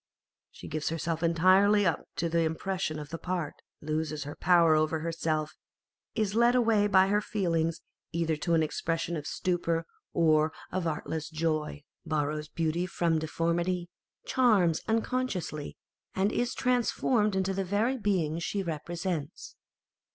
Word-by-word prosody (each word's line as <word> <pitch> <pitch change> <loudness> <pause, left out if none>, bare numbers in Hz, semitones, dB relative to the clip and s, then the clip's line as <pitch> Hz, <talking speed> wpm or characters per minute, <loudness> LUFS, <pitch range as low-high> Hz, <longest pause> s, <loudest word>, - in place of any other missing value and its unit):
She - - -11
gives 155 0 -2
herself 165 0 -2
entirely 185 +5 +4
up 165 - 0
to 170 - 0
the 170 0 +1
impression 165 +1 -1
of 150 -1 -7
the 165 - -5
part, 175 -5 -3 0.3
loses 155 -1 -2
her 145 +1 -7
power 170 -3 +5
over 155 +1 +1
herself, 160 -2 -2 0.6
is 215 -3 0
led 235 +2 +4
away 225 -4 +3
by 190 -1 +5
her 205 +1 +2
feelings 165 -6 -1 0.3
either 165 -1 0
to 170 +3 +1
an 160 - +3
expression 165 +2 -2
of 150 -2 -5
stupor 170 -2 -1 0.3
or 155 -1 +3 0.2
of 185 -2 -1
artless 160 0 -3
joy, 155 -2 -2 0.2
borrows 150 -1 -1
beauty 165 +3 -1
from 170 -3 +1
deformity, 170 +2 -1 0.4
charms 210 -11 +3
unconsciously, 225 - -2 0.4
and 195 +2 +2
is 240 +1 -1
transformed 245 -4 +1
into 190 0 0
the 195 0 -1
very 210 +7 +1
being 175 -7 0
she 195 +3 -2
represents. 170 0 -4
170 Hz, 140 wpm, -29 LUFS, 160-195 Hz, 0.6 s, power